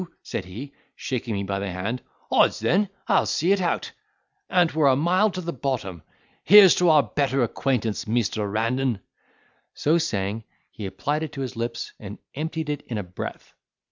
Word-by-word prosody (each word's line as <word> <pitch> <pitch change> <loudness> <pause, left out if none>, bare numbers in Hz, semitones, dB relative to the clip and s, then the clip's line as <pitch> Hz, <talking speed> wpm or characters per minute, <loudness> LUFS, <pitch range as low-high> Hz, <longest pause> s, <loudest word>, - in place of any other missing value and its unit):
said 95 - -4
he, 120 +10 -8 0.2
shaking 120 -4 -3
me 100 - -2
by 100 0 -2
the 100 0 -3
hand; 100 +7 -3 0.3
"odds - - +4
then, 180 - +2 0.2
I'll - - +3
see 170 +5 +1
it 200 -1 +3
out, 175 - -1 0.6
an't 175 -2 +3
were 155 -2 +3
a 130 - +5
mile 180 +9 +3
to 185 -1 -5
the 170 -1 -4
bottom: 115 - -3 0.4
here's 200 0 +9
to 180 -1 +4
our 155 -3 +6
better 135 -2 0
acquaintance, 115 -3 -1
measter 110 -2 0
Randan," 115 +2 0 0.8
So 160 +3 +2
saying, 105 -7 -2 0.3
he 105 - -6
applied 145 +11 -2
it 155 -2 -5
to 135 - -5
his 130 -3 -4
lips, 115 +1 -4
and 105 0 -8 0.2
emptied 160 +1 -3
it 145 - -3
in 115 - -3
a 105 - -2
breath. 90 0 -8
130 Hz, 175 wpm, -24 LUFS, 105-160 Hz, 0.8 s, here's